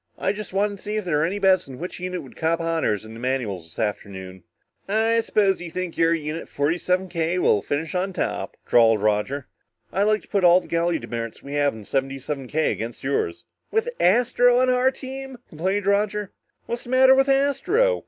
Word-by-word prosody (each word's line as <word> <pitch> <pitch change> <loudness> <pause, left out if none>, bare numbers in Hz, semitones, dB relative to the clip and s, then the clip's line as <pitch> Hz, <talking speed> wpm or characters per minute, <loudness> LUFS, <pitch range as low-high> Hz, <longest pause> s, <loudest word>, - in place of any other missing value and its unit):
"I 195 - 0
just 210 0 -7
wanted 200 +1 0
to - - -16
see 210 0 -3
if 215 -2 -2
there 160 -4 +1
were 150 - +2
any 195 +4 -3
bets 190 -5 +3
on 130 - -8
which 180 +5 -6
unit 180 0 -4
would - - -14
cop 165 +1 0
honors 165 -11 0
in 110 - -10
the 115 - -9
manuals 120 -9 -2
this 80 - -14
afternoon." 95 -3 -4 0.5
"I 225 +3 +2
suppose 200 -4 +1
you 175 - -6
think 180 0 -4
your 165 0 +3
Unit 155 +1 -5
77 180 +5 0
K 170 0 -1
will 105 - +3
finish 150 +7 -3
on 185 +1 -1
top?" - - -3
drawled 115 -2 +5
Roger. 110 +6 0 0.5
"I'd 195 +2 +2
like 215 0 +2
to - - -20
bet 200 -3 +1
all 175 +1 +7
the - - -13
galley 170 0 +1
demerits 115 -4 -6
we 140 - -7
have 145 -3 +1
in 110 -2 -10
77 135 +1 -3
K 155 +4 +1
against 115 +1 -5
yours." 140 - -1 0.2
"With 450 +2 0
Astro 245 +4 +4
on 255 0 +3
our 250 +1 +3
team?" 265 0 -7
complained 190 +5 -1
Roger. 205 0 +1 0.3
"What's 235 0 -4
the - - -10
matter 260 +1 +6
with 270 +1 +3
Astro?" 360 - +2
180 Hz, 205 wpm, -23 LUFS, 140-215 Hz, 0.5 s, all